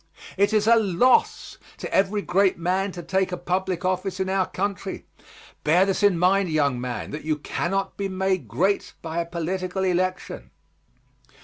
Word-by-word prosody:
It 200 +2 +2
is 215 -1 +2
a 230 +1 +6
loss 225 - +2 0.2
to - - -6
every 200 +1 +2
great 190 +1 +2
man 185 +3 0
to 175 - -7
take 190 +2 0
a 180 - -3
public 180 0 -2
office 185 0 -1
in 190 0 -1
our 190 -1 +1
country. 195 +1 -4 0.6
Bear 175 +5 +4
this 195 +1 -1
in 200 -4 +4
mind, 185 +2 +3
young 140 -5 +1
man, 125 -1 -5
that 150 - -6
you 155 0 -1
cannot 195 +6 -2
be 200 -1 -2
made 190 -6 -1
great 185 - 0
by 165 0 -3
a 170 - -2
political 180 +2 -3
election. 185 0 -2
185 Hz, 170 wpm, -24 LUFS, 170-195 Hz, 0.6 s, a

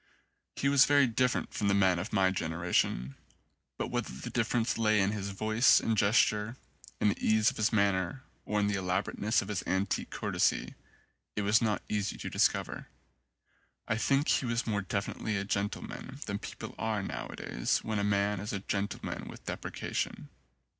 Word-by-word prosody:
He 140 - 0
was 140 -1 +6
very 145 -1 +5
different 125 +1 0
from 105 - -1
the 100 - +3
men 95 -3 +4
of 95 +6 -5
my 95 -3 +3
gen 85 -4 -2
eration; 80 -7 0 0.6
but - - -3
whether - - -2
the 65 - -7
difference 115 0 +1
lay 110 -1 +3
in 95 +1 +2
his 100 -2 -3
voice 110 +5 +4
and 115 - 0
gesture, 105 +2 +2 0.4
in 105 - +3
the - - -3
ease 110 -1 +4
of - - -12
his 110 0 +2
manner, 100 +3 +1 0.2
or 105 - -1
in 105 - +2
the 105 - +1
elaborateness 95 +4 0
of - - -10
his 105 -3 -2
antique 95 +1 0
courtesy, - - 0 0.6
it 105 - -1
was 105 +3 +4
not 110 -3 0
easy 105 -2 -1
to - - -6
discover. - - +1 1.0
I - - +1
think 140 +5 +2
he 130 - +2
was 115 +1 0
more 105 -3 0
definitely 100 +2 -2
a 100 - -1
gentleman 100 +1 -4
than - - -3
people - - -7
are 110 -3 -1
nowadays 60 - -2
when 110 -2 -1
a - - 0
man 100 0 +1
is 105 +2 -4
a 100 - -1
gentleman 100 +1 -3
with - - -11
deprecation. - - -4
105 Hz, 175 wpm, -31 LUFS, 100-110 Hz, 1.0 s, was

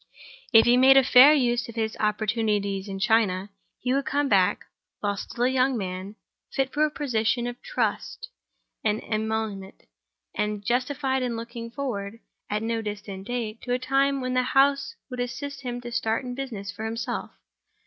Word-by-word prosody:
If 225 -2 +7
he 240 +1 +5
made 265 +1 +7
a 270 - +7
fair 255 +3 +8
use 240 -5 +2
of 230 - -9
his 220 -1 -1
opportunities 210 -2 0
in 195 -1 -5
China, 200 -2 +1 0.3
he 250 +1 0
would 275 +1 0
come 285 0 +1
back, 195 -4 +2 0.3
while 205 -1 -1
still 235 +4 -4
a - - +5
young 260 0 +2
man, 190 +1 -5 0.4
fit 270 -1 -1
for 300 - +2
a 305 - +3
position 240 -5 0
of 245 0 -6
trust 480 - -2 0.6
and 215 0 +1
emolument, 215 -2 -3 0.5
and 210 -1 -2
justified 260 +3 0
in 245 -2 -2
looking 230 0 -7
forward, 230 -5 -4 0.3
at 210 +1 -1
no 225 0 -1
distant 205 -2 -6
date, 230 -3 -3
to 245 - -2
a - - +2
time 270 +2 +1
when 255 0 -2
the 255 - +3
House 275 +2 +2 0.2
would 250 - -5
assist 280 +3 -4
him 245 -2 -4
to 240 0 -7
start 225 +2 -1
in 250 - -4
business 230 -7 -5
for 210 +2 -8
himself. 225 +1 -4
235 Hz, 175 wpm, -26 LUFS, 210-260 Hz, 0.6 s, fair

